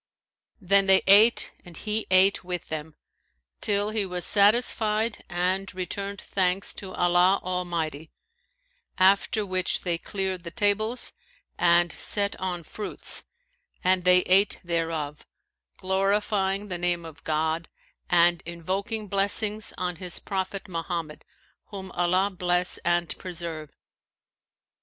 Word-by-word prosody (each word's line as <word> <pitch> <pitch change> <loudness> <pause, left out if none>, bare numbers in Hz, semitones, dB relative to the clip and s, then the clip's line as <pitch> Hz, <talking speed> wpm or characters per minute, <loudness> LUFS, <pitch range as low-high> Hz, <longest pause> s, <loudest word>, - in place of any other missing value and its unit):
Then 195 0 +3
they 190 0 +6
ate 210 +4 +5
and 175 -3 -12
he 215 0 -2
ate 185 +1 +4
with 180 -1 -5
them, 155 0 -6 0.7
till 205 0 0
he 215 -1 0
was 180 -2 -2
satisfied 215 +1 +2
and 185 +2 -1
returned 195 +2 -4
thanks 185 0 0
to 190 -2 -8
Allah 175 +2 +3
Almighty; 170 -4 -3 0.9
after 200 +3 +3
which 185 -1 0
they 170 -2 -1
cleared 190 -1 -3
the 170 - -6
tables 215 +5 0 0.5
and 175 -1 +4
set 200 +4 0
on 180 -2 -3
fruits, 210 +6 -1 0.6
and 185 0 +2
they 180 0 +6
ate 190 +3 +3
thereof, 165 -4 -3 0.5
glorifying 195 +1 0
the 180 -2 -3
name 175 -1 0
of 155 -3 -12
God 160 +1 -1 0.4
and 175 -1 +4
invoking 195 +6 -4
blessings 205 +2 +1
on 180 -2 -3
His 180 -1 -3
prophet 195 0 -4
Mohammed 165 -3 -5 0.4
(whom 190 -2 -9
Allah 185 +3 +1
bless 180 0 0
and 175 -1 0
preserve!) 165 -4 -6
185 Hz, 120 wpm, -26 LUFS, 175-200 Hz, 0.9 s, they